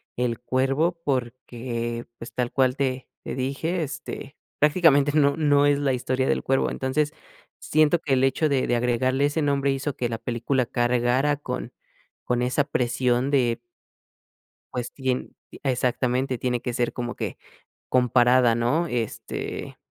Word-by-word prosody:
el 120 -2 -1
cuervo, 135 +7 0
porque, 120 -2 -3
pues, 115 - -9
tal 125 -1 -1
cual 130 -2 +2
te 130 -2 -2
te - - -5
dije, 140 +7 -1
este, 140 0 -7 0.2
prácticamente 150 -2 +4
no 140 -1 +3
no 145 -2 +4
es 145 0 +3
la 140 -2 +1
historia 130 +1 -1
del - - +1
cuervo. 135 0 +1
Entonces, 145 +3 -1 0.5
siento 155 +2 +3
que 145 -4 -1
el 130 0 +3
hecho 135 +4 +2
de 135 -2 +1
de 120 - +1
agregarle 125 +3 +1
ese 145 +2 0
nombre, 140 -1 +1
hizo 135 +1 -2
que 120 - -2
la 115 - -3
película 120 +3 -1
cargara 120 +4 +1
con 125 -3 -5 0.5
con 125 0 0
esa 125 +4 +2
presión 125 -1 0
de 125 -4 +2 1.1
pues 125 -1 -4
tien 130 -2 -3 0.3
exactamente 130 0 0
tiene 125 0 -1
que 125 - -3
ser 120 0 0
como 120 -1 -4
que - - -4 0.5
comparada, 125 -1 +4
¿no? 125 +9 +1
Este 120 -6 -4
130 Hz, 150 wpm, -25 LUFS, 120-140 Hz, 1.1 s, prácticamente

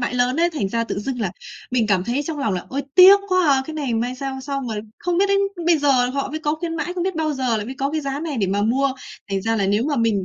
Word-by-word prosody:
mãi 245 +1 -2
lớn 250 +5 +1
ấy." 345 - +3
Thành 255 - -2
ra 230 +3 -1
tự 215 - -4
dưng 245 +3 -4
là 195 -5 -1 0.4
mình 245 -3 +1
cảm 190 -3 +1
thấy 255 +6 -1
trong 305 0 -5
lòng 220 -8 0
là 180 - -4
"Ôi, 280 +2 -3
tiếc 380 +2 +9
quá 370 -3 +3
à!" 265 -1 +2
cái 315 - -6
này 280 -6 -2
may 245 +3 -1
sao 265 0 -5
xong 275 -1 -4
rồi 215 -2 -3 0.2
không 350 0 -1
biết 395 - +4
đến 395 0 +3 0.3
bây 340 -2 +4
giờ 270 -4 +3
họ 275 +1 -3
mới 310 - -3
có 300 -1 -1
khuyến 330 +1 -4
mãi, 355 - -3
không 360 - -2
biết 380 - -1
bao 315 -1 0
giờ 255 -4 0
là 210 - -3
mới 255 +5 -6
có 275 +1 0
cái 310 +1 -1
giá 275 0 -3
này 315 -3 -4
để 205 -4 +1
mà 200 +2 0
mua. 265 +5 +1 0.4
Thành 195 -1 -1
ra 225 +1 0
là 200 -3 +1
nếu 205 +4 +1
mà 290 0 -1
mình 225 -5 +1
270 Hz, 310 wpm, -21 LUFS, 230-310 Hz, 0.4 s, tiếc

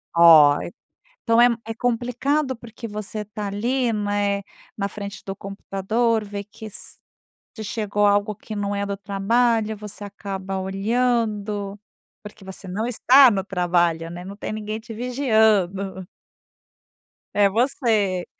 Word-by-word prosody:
Olha, 165 -1 +7 0.5
então 230 0 +3
é 240 - +8 0.2
é 225 - -4
complicado 250 +4 0
porque 230 0 -9
você 210 0 -5
tá 210 0 -6
ali, 235 +5 0
né, 205 -1 0 0.3
na 200 -1 -1
frente 200 -1 -8
do 195 0 -5
computador 210 +3 -1
vê 200 0 -5
que 215 +2 -11
se 210 - -12 0.4
chegou 205 -1 -1
algo 205 +1 +2
que 215 - -8
não 205 0 -2
é 200 0 -1
do 200 0 -3
trabalho 220 +3 +1
você 210 0 -9
acaba 195 -1 -5
olhando, 210 0 -1 0.4
porque 210 -1 -12
você 190 +1 -9
não 200 +5 -2
está 250 +2 +6
no 195 -2 -1
trabalho, 175 -3 0
né, 175 +1 -7
não 195 +2 -8
tem 205 - -5
ninguém 215 0 -4
te 225 +1 -10
vigiando. 215 -7 +1 1.3
É 205 -1 +4
você. 220 - +1
205 Hz, 135 wpm, -23 LUFS, 195-225 Hz, 1.3 s, é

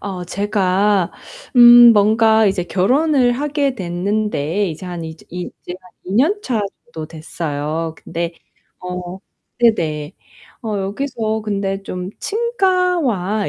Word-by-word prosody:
어 185 -3 -5
제가 195 -1 +1 0.5
음 240 -1 +9
뭔가 220 +1 +4
이제 190 -3 0
결혼을 255 - +2
하게 285 +1 -1
됐는데 195 - -1
이제 165 +3 -7
한 175 -2 -6
이제 160 0 -10
이 180 0 -5
이제 175 - -7
한 180 - -19 0.2
2 - - -4
년차 270 - +1 0.3
정도 155 -1 -6
됐어요. 160 0 -4
근데 170 0 -4 0.5
어 180 0 -6 0.4
네네. 160 -10 +1 0.5
어 215 -3 -2
여기서 220 +2 -3
근데 200 -2 -2
좀 180 -1 -6
친가와 360 - 0
200 Hz, 210 characters per minute, -18 LUFS, 180-240 Hz, 0.5 s, 음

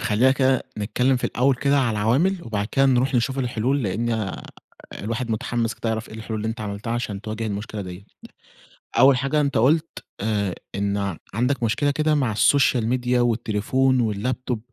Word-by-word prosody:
خلينا 115 +2 +3
كده 130 -1 +2 0.2
نتكلم 125 +5 +1
في 125 - -4
الأول 130 +2 +2
كده 140 +3 +2
على 125 -3 +2
العوامل 125 - +2
وبعد 105 -3 -2
كده 135 0 +4
نروح 130 +1 +2
نشوف 130 +3 +1
الحلول؛ 125 -3 -3 0.2
لأن 115 +4 -1
آآ 110 -4 -3 0.6
الواحد 115 +3 -3
متحمس 115 +1 -1
كده 115 - -4
يعرف 110 0 -2
إيه - - -10
الحلول 110 0 -5
اللي 110 - -2
إنت 110 0 -5
عملتها 105 +2 -4
عشان 110 -4 -3
تواجه 110 +1 -4
المشكلة 105 +1 -4
ديَّة. 90 +1 -9 0.9
أول 135 0 +7
حاجة 135 +4 0
أنت 140 -4 +1
قلت 155 +7 +1 0.2
آآ، 100 -3 -1 0.2
إن 100 0 -1 0.2
عندك 125 +4 0
مشكلة 115 +6 +1
كده 155 +1 +1
مع 130 -7 0
الsocial 135 +2 +4
media 125 0 0
والتليفون 120 +1 +1
والlaptop. 125 +3 -2
120 Hz, 170 wpm, -23 LUFS, 110-130 Hz, 0.9 s, أول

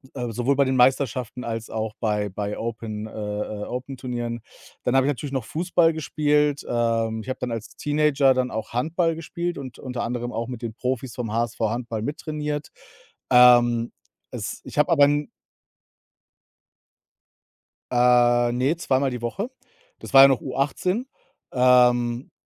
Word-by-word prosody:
äh, 120 -2 -3
sowohl 125 +4 0
bei 140 - +4
den 130 0 0
Meisterschaften 125 -1 +1
als 115 -1 -5
auch 110 -1 -3
bei 105 -2 0
bei 100 +2 -4
Open 110 -2 -5
äh, - - -10
äh, 105 0 -4
Open-Turnieren. 125 -2 -5 0.4
Dann 125 - +1
habe 135 0 +4
ich - - +3
natürlich 140 +1 -5
noch 130 -5 -2
Fußball 165 +3 +2
gespielt, 150 -2 +1
äh, 115 -1 0
ich 120 - -10
habe 130 - -3
dann 125 - -3
als 115 -2 -6
Teenager 145 -2 +2
dann 130 0 0
auch 110 0 -5
Handball 165 +6 0
gespielt 170 +1 -4
und 130 -3 -8
unter 125 -2 -5
anderem 120 +1 -3
auch 115 +1 -3
mit 125 -1 -7
den 115 -2 -5
Profis 125 0 -3
vom 115 -4 -4
HSV 115 0 -2
Handball 115 0 -2
mittrainiert. 150 +1 -4 0.6
Ähm, 120 -1 +6 0.4
es - - -5
ich - - -8
habe 150 - +3
aber 145 -4 +6
n 145 +1 +1 2.7
Äh, 120 -1 +4
ne, 130 +7 +1
zweimal 135 -4 +1
die 125 -2 -5
Woche. 200 - -3 0.5
Das - - -11
war 135 - +11
ja 135 - +9
noch 135 -2 +2
U18. 145 - -1 0.5
Ähm, 125 -1 +3
125 Hz, 155 wpm, -24 LUFS, 115-140 Hz, 2.7 s, war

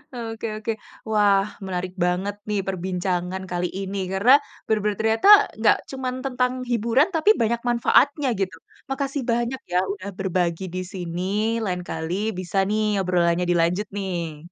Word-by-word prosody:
Oke 225 -1 -5
oke, 220 +1 -2 0.4
wah 205 -2 +4 0.2
menarik 185 0 -3
banget 190 +3 -1
nih 205 -1 +1
perbincangan 185 0 -2
kali 175 0 0
ini 195 0 -4 0.2
karena 205 +7 +4 0.3
benar-benar 210 -2 0
ternyata 225 - +2 0.3
nggak 220 - +5
cuman 260 -1 -3
tentang 250 -1 0 0.2
hiburan 235 +6 +3
tapi 325 +6 +3
banyak 235 +1 +1
manfaatnya 280 +4 +3
gitu, 185 -1 -2 0.3
makasih 275 +1 -2
banyak 240 +2 -1
ya 180 - +2 0.2
udah 200 0 -7
berbagi 180 -1 -1
di 185 - -1
sini, 175 -1 -4 0.4
lain 180 -1 -2
kali 160 +2 -3 0.3
bisa 185 +1 -4
nih 215 -1 +1
obrolannya 175 -1 +2
dilanjut 175 +4 +2
nih. 170 -6 -4
195 Hz, 140 wpm, -23 LUFS, 180-230 Hz, 0.4 s, nggak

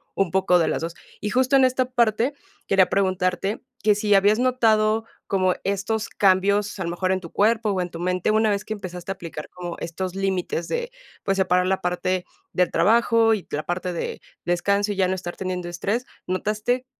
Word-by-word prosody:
un 195 -2 +1
poco 185 -1 +3
de 165 - +2
las - - -1
2. 165 +1 -4 0.3
Y 210 - -2
justo 260 +2 +3
en 265 - +5
esta 255 0 +2
parte, 240 +1 +1 0.3
quería 190 -2 +4
preguntarte, 185 +1 0 0.2
que 210 - +5
si 210 0 +1
habías 205 +3 +4
notado 225 -3 +2 0.2
como 185 -2 +2
estos 200 +3 -1
cambios, 200 +1 +2
a 185 - -1
lo 170 - -3
mejor 185 +2 -1
en 190 - 0
tu 170 - -10
cuerpo 220 +1 +2
o 185 - 0
en 180 - -3
tu 170 0 -8
mente, 180 +1 0
una 220 0 +3
vez 200 0 0
que 220 - -3
empezaste 185 -2 -6
a - - -3
aplicar 165 -4 -7
como 175 -1 -6
estos 180 +2 -4
límites 190 -3 -1
de, 480 - -3 0.3
pues, 195 -1 0
separar 180 -1 +2
la 190 +1 0
parte 180 +1 -1 0.3
del 180 -1 +2
trabajo 225 0 +4
y 205 - -3
la 150 - -2
parte 180 +1 -2
de 170 - -4 0.2
descanso 200 +4 +1
y - - -8
ya 185 -1 +3
no 185 - 0
estar 175 -1 -6
teniendo 185 -2 -3
estrés, 205 +8 -2 0.2
¿notaste 215 +7 -1
195 Hz, 200 wpm, -23 LUFS, 180-215 Hz, 0.3 s, en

